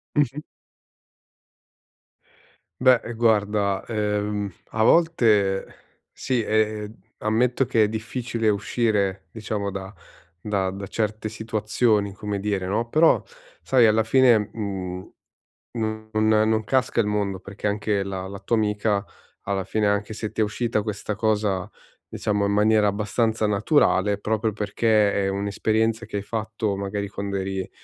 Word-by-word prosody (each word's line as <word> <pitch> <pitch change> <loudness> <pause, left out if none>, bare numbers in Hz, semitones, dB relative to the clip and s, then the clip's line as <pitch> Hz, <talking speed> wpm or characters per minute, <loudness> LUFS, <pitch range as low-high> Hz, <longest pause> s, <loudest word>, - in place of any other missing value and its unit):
Mh-mh. 145 -1 +1 2.4
Beh, 130 -2 +6
ehm, 120 - -5
guarda, 105 -3 +1
ehm, 105 -2 -1 0.2
a 110 - 0
volte 110 - +3 0.5
sì, 125 -3 -1
ehm, 110 0 0 0.2
ammetto 125 +4 +1
che 115 -2 +2
è - - +1
difficile 115 +1 -2
uscire, 100 -2 0
diciamo, 105 -2 -3
da 95 0 -7 0.5
da 95 -1 -1
da 100 +1 -7
certe 110 +1 -2
situazioni, 110 -1 0
come 100 0 -4
dire, 100 -2 -1
no, 110 +5 -1
però 155 +6 +4 0.4
sai 130 -3 +3
alla 110 +1 +4
fine, 115 -2 +4
mhmm, 95 -4 -5 0.6
no 110 -1 -3
non 110 0 +2 0.2
non 110 0 +1
casca 130 +3 0
il 115 - +3
mondo, 100 -2 -1
perché 100 +2 -5
anche 105 0 0
la 95 -1 -4
la 100 +1 -8
tua 100 +4 0
amica 105 -1 0 0.4
alla 95 -1 -1
fine, 105 +2 -1
anche 105 +1 0
se 110 -1 -4
ti - - -2
è - - +5
uscita 105 +1 -1
questa 105 0 -4
cosa, 105 -2 0 0.4
diciamo 105 -1 -1
in - - 0
maniera 105 0 +4
abbastanza 110 +2 0
naturale, 105 -2 +2
proprio 110 +1 -1
perché 105 0 +2
è 100 -1 0
un'esperienza 110 +3 0
che 110 - -7
hai 100 - -2
fatto 110 -1 -3
magari 100 +1 -3
quando 100 -1 -4
eri 95 0 -3
105 Hz, 140 wpm, -24 LUFS, 100-110 Hz, 2.4 s, Beh